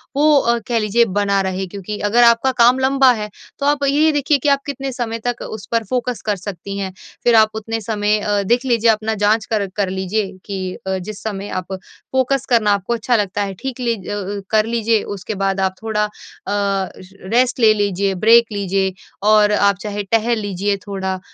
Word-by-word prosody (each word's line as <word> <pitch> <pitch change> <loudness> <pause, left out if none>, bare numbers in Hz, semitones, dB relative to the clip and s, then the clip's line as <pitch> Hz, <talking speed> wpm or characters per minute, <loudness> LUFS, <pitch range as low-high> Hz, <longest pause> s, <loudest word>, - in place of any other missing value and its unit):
वो 280 -5 +3
कह 235 -2 +1
लीजिए 220 +2 +2
बना 200 -1 0
रहे 190 0 -2
क्योंकि 200 +2 -6
अगर 220 +4 +3
आपका 235 +3 +4
काम 250 +1 +4
लंबा 265 0 +4
है 210 -2 -5 0.3
तो 280 - -2
आप 290 0 +1
ये 300 +3 +3
देखिए 290 0 +2
कि 295 - +3
आप 280 -1 +3
कितने 275 -1 -4
समय 235 -2 -4
तक 245 -1 -2
उस 215 -3 -7
पर 230 -1 +1
फ़ोकस 250 -3 -2
कर 210 -1 +1
सकती 195 +1 -7
हैं? 195 -1 -3 0.3
फिर 240 -1 +4
आप 220 -1 +6
उतने 225 +1 -4
समय 210 0 0
अ, 205 -1 0
देख 240 +6 +1
लीजिए 235 -2 +3
अपना 220 0 -1
जाँच 215 +1 +2
कर 205 -2 0
कर 200 -2 0
लीजिए 190 +2 -2
कि 190 -2 -4
अ, 190 0 0
जिस 200 +3 -8
समय 205 -2 -4
आप 185 - -16
फ़ोकस 260 +7 -2
करना 225 -4 +3
आपको 200 +3 -1
अच्छा 235 +1 0
लगता 205 -2 -1
है 195 -1 -4
ठीक 265 -2 -5
ली 235 -2 0
ज 190 - -10
अ, 205 0 -4
कर 215 -1 +3
लीजिए 225 -1 +1
उसके 200 +3 -6
बाद 195 0 -1
आप 190 0 0
थोड़ा 215 -1 0
अ, - - -6 0.4
र 195 -1 -3
रेस्ट 250 +1 +2
ले 220 -2 +6
लीजिए, 200 -2 0
ब्रेक 230 +5 +5
लीजिए 195 -1 -1 0.3
और 210 -1 +5
आप 200 -1 +3
चाहे 205 -1 -4
टहल 230 +1 +2
लीजिए 200 0 -1
थोड़ा 190 -1 -3
215 Hz, 200 wpm, -19 LUFS, 200-235 Hz, 0.4 s, आप